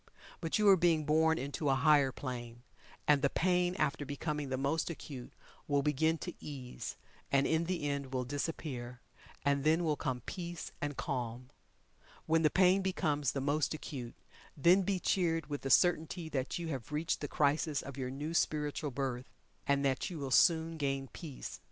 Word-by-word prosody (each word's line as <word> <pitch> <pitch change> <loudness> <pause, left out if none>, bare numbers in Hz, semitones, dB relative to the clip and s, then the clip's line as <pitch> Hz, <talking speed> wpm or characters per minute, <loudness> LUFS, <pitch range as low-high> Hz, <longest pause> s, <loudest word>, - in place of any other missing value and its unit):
But 165 -2 0
you 210 -1 +3
are 195 - +9
being 165 -4 +2
born 160 +2 +3
into 140 +1 -2
a 135 - +4
higher 145 -2 +4
plane, 120 -2 -6 0.4
and 145 -2 +5
the 140 - +3
pain 180 +2 +1
after 150 -2 0
becoming 145 0 -3
the 130 - -1
most 140 +6 0
acute 140 -6 -7 0.4
will 145 -1 +2
begin 160 +3 +2
to 175 +2 -6
ease, 130 -4 -6 0.3
and 140 0 +4
in 160 +1 +2
the 175 -3 -2
end 140 -2 -3
will 130 -1 -1
disappear, 130 -3 -4 0.5
and 140 -1 +2
then 160 +3 +3
will 155 -2 +1
come 130 -3 -3
peace 175 +4 -6
and 145 -1 -3
calm. 125 0 -4 0.7
When 160 0 +3
the 155 - +4
pain 185 +2 +4
becomes 155 -7 0
the 135 - -2
most 145 +2 +1
acute, 125 -6 -7 0.4
then 175 +7 +5
be 190 0 0
cheered 165 -5 0
with 145 - -3
the 135 - -3
certainty 165 +1 +3
that 130 -3 -2
you 170 -2 -4
have 135 -3 -5
reached 155 +4 -1
the 145 - -2
crisis 145 +1 +1
of 140 - -8
your 130 -2 -3
new 145 +5 -4
spiritual 150 -2 0
birth, 130 -1 -3 0.4
and 140 -1 +2
that 130 -2 0
you 175 - -6
will 140 -3 -4
soon 165 +2 +4
gain 135 -2 -1
peace. 150 -6 -7
150 Hz, 180 wpm, -33 LUFS, 135-165 Hz, 0.7 s, are